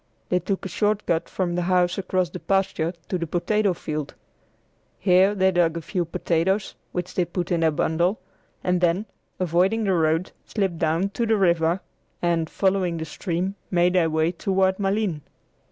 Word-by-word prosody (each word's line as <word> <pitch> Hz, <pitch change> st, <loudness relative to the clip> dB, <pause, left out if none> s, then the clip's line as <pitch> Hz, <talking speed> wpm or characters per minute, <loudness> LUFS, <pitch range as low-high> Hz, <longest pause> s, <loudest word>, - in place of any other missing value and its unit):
They 180 Hz, -, +2 dB
took 190 Hz, +3 st, -3 dB
a -, -, -1 dB
short 210 Hz, +3 st, 0 dB
cut 165 Hz, -1 st, 0 dB
from 180 Hz, -2 st, -1 dB
the 175 Hz, -, 0 dB
house 180 Hz, 0 st, +2 dB
across 185 Hz, -2 st, 0 dB
the 180 Hz, -, -6 dB
pasture 185 Hz, -3 st, 0 dB
to 185 Hz, -, -2 dB
the 170 Hz, -, -3 dB
potato 200 Hz, +4 st, +1 dB
field. 150 Hz, -3 st, -5 dB, 0.8 s
Here 190 Hz, +2 st, +4 dB
they 190 Hz, -1 st, +3 dB
dug 170 Hz, -2 st, +2 dB
a -, -, -4 dB
few 180 Hz, 0 st, -1 dB
potatoes, 175 Hz, +4 st, 0 dB, 0.2 s
which 180 Hz, 0 st, -4 dB
they 180 Hz, -, +2 dB
put 175 Hz, +1 st, -4 dB
in 170 Hz, -, +2 dB
their 165 Hz, -1 st, +4 dB
bundle, 170 Hz, +6 st, +1 dB, 0.4 s
and 180 Hz, -1 st, +1 dB
then, 180 Hz, +4 st, +2 dB, 0.3 s
avoiding 185 Hz, +5 st, +2 dB
the 195 Hz, -2 st, +2 dB
road, 165 Hz, +1 st, +1 dB
slipped 190 Hz, -6 st, -2 dB
down 165 Hz, +4 st, +1 dB
to 230 Hz, +3 st, -2 dB
the 220 Hz, 0 st, +3 dB
river, 170 Hz, -1 st, +2 dB, 0.4 s
and, 170 Hz, -2 st, 0 dB
following 190 Hz, -3 st, +1 dB
the 160 Hz, -, -4 dB
stream, 180 Hz, +3 st, -2 dB, 0.2 s
made 175 Hz, 0 st, +3 dB
their 175 Hz, -3 st, +3 dB
way 160 Hz, +1 st, +1 dB
toward 190 Hz, +2 st, +1 dB
Malines. 195 Hz, -5 st, 0 dB
180 Hz, 175 wpm, -24 LUFS, 170-195 Hz, 0.8 s, Here